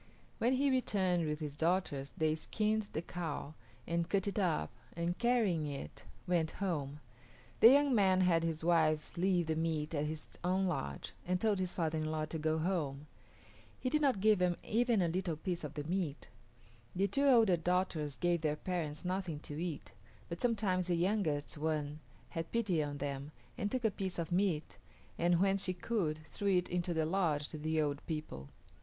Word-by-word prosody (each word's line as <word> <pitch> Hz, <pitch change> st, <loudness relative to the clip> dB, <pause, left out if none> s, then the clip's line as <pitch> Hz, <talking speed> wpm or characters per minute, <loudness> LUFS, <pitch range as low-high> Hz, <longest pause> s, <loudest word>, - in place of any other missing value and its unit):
When 245 Hz, +3 st, +3 dB
he 275 Hz, +1 st, +3 dB
returned 185 Hz, -9 st, +1 dB
with 150 Hz, +1 st, -2 dB
his 145 Hz, -2 st, -4 dB
daughters 160 Hz, -4 st, 0 dB
they 155 Hz, -1 st, +2 dB
skinned 215 Hz, +6 st, -1 dB
the 160 Hz, -, -3 dB
cow 160 Hz, -4 st, -4 dB, 0.3 s
and 170 Hz, 0 st, -1 dB
cut 200 Hz, 0 st, +1 dB
it 200 Hz, -, -1 dB
up 165 Hz, -, +1 dB, 0.2 s
and, 170 Hz, +1 st, -1 dB
carrying 220 Hz, -11 st, +2 dB
it, 140 Hz, -, -7 dB, 0.2 s
went 170 Hz, -3 st, +1 dB
home. 150 Hz, -7 st, -2 dB, 0.6 s
The 225 Hz, -, +10 dB
young 285 Hz, 0 st, +5 dB
man 190 Hz, -4 st, +4 dB
had 175 Hz, -3 st, +4 dB
his 165 Hz, -1 st, -2 dB
wives 160 Hz, -2 st, +2 dB
leave 180 Hz, -1 st, +2 dB
the 160 Hz, 0 st, 0 dB
meat 160 Hz, -1 st, -1 dB
at 150 Hz, -1 st, 0 dB
his 155 Hz, 0 st, -6 dB
own 185 Hz, +2 st, +2 dB
lodge 70 Hz, -, -3 dB
and 180 Hz, +1 st, 0 dB
told 210 Hz, -2 st, +2 dB
his 185 Hz, -1 st, -1 dB
father 160 Hz, -2 st, 0 dB
in 155 Hz, -, -2 dB
law 155 Hz, 0 st, -1 dB
to 160 Hz, +1 st, -5 dB
go 155 Hz, +1 st, +1 dB
home. 155 Hz, -5 st, -1 dB, 0.7 s
He 255 Hz, -, -1 dB
did 305 Hz, -, +2 dB
not 270 Hz, -8 st, +3 dB
give 215 Hz, -2 st, +4 dB
him 180 Hz, -1 st, +2 dB
even 230 Hz, -3 st, +2 dB
a -, -, +2 dB
little 175 Hz, -1 st, -1 dB
piece 175 Hz, +2 st, -3 dB
of 150 Hz, -1 st, -6 dB
the 145 Hz, -, -3 dB
meat. 165 Hz, -2 st, -2 dB, 0.7 s
The 195 Hz, +2 st, +2 dB
two 280 Hz, +8 st, +2 dB
older 225 Hz, -8 st, +6 dB
daughters 170 Hz, -4 st, -1 dB
gave 175 Hz, -2 st, +1 dB
their 150 Hz, -2 st, +1 dB
parents 155 Hz, -2 st, -3 dB
nothing 180 Hz, -3 st, -2 dB
to 150 Hz, +1 st, -6 dB
eat, 170 Hz, -5 st, -4 dB, 0.4 s
but 170 Hz, 0 st, -5 dB
sometimes 200 Hz, -6 st, +1 dB
the 175 Hz, -, +2 dB
youngest 170 Hz, -6 st, 0 dB
one 150 Hz, -1 st, -1 dB, 0.3 s
had 165 Hz, -1 st, -5 dB
pity 205 Hz, -9 st, +1 dB
on 145 Hz, -1 st, -3 dB
them 140 Hz, +1 st, -4 dB, 0.2 s
and 205 Hz, -, -1 dB
took 255 Hz, -3 st, -1 dB
a 220 Hz, -, +4 dB
piece 190 Hz, -2 st, -4 dB
of 170 Hz, 0 st, -3 dB
meat 175 Hz, -4 st, 0 dB, 0.4 s
and, 175 Hz, 0 st, +3 dB
when 195 Hz, +1 st, +3 dB
she 185 Hz, -1 st, 0 dB
could, 170 Hz, -5 st, -2 dB
threw 195 Hz, +4 st, +1 dB
it 180 Hz, -, -1 dB
into 175 Hz, 0 st, -1 dB
the 160 Hz, -2 st, +1 dB
lodge 160 Hz, -4 st, 0 dB
to 155 Hz, -, -7 dB
the 160 Hz, +1 st, 0 dB
old 145 Hz, -2 st, 0 dB
people. 150 Hz, -, -5 dB
170 Hz, 190 wpm, -34 LUFS, 155-190 Hz, 0.7 s, The